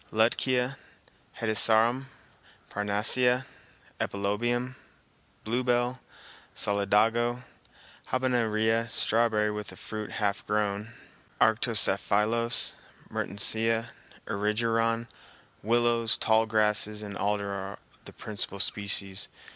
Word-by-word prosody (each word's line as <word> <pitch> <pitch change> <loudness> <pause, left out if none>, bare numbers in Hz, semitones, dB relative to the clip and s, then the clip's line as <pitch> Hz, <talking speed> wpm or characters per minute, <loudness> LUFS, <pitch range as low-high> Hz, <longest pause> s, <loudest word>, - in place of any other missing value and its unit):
Lutkea, 125 +4 +1 0.6
hedysarum, 115 +3 +3 0.7
parnassia, 120 +5 +2 0.5
epilobium, 120 +6 -2 0.7
bluebell, 120 +2 0 0.6
solidago, 115 +4 +1 0.6
habenaria, 115 -3 0
strawberry 110 -1 +1
with 105 0 -7
fruit 110 -1 -6
half 100 -2 -1
grown, 105 +1 -1 0.5
arctostaphylos, 110 +1 +2 0.4
mertensia, 115 +3 +1 0.4
erigeron, 115 +2 0 0.5
willows, 115 +1 +2
tall 110 0 +2
grasses 105 -1 +1
and 100 -1 -7
alder 100 0 -1
are 100 0 -6 0.3
the - - -8
principal 100 -2 -4
species. 100 -1 +1
110 Hz, 75 wpm, -28 LUFS, 105-120 Hz, 0.7 s, hedysarum